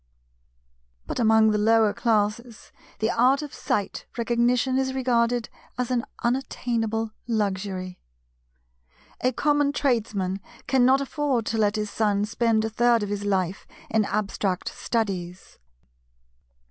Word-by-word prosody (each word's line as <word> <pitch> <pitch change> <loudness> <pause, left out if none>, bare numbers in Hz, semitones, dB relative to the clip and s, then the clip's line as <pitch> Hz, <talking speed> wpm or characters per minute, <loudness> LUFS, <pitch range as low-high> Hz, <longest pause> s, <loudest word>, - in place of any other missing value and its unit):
But - - -4
among 220 -1 +5
the 210 - +1
lower 220 0 +4
classes 220 +1 -1 0.3
the 220 +2 0
art 260 +5 +3
of 295 - -8
Sight 200 -2 -2
Recognition 240 +2 +1
is 265 0 -1
regarded 240 -2 +1 0.3
as 250 0 -2
an 240 -2 0 0.2
unattainable 230 -3 -1 0.2
luxury. 190 -4 -2 1.2
A 255 - +3
common 290 +2 +2
Tradesman 210 -9 0 0.3
cannot 265 +1 +4
afford 275 -4 -1
to 225 - -1
let 210 0 +2
his 210 -1 -2
son 205 -2 +1
spend 225 0 +1
a - - -1
third 235 0 +3
of 205 - -3
his 205 0 -3
life 190 -2 -1 0.2
in 220 -1 +2
abstract 200 -2 -2
studies. 185 -6 -4
225 Hz, 120 wpm, -25 LUFS, 205-245 Hz, 1.2 s, among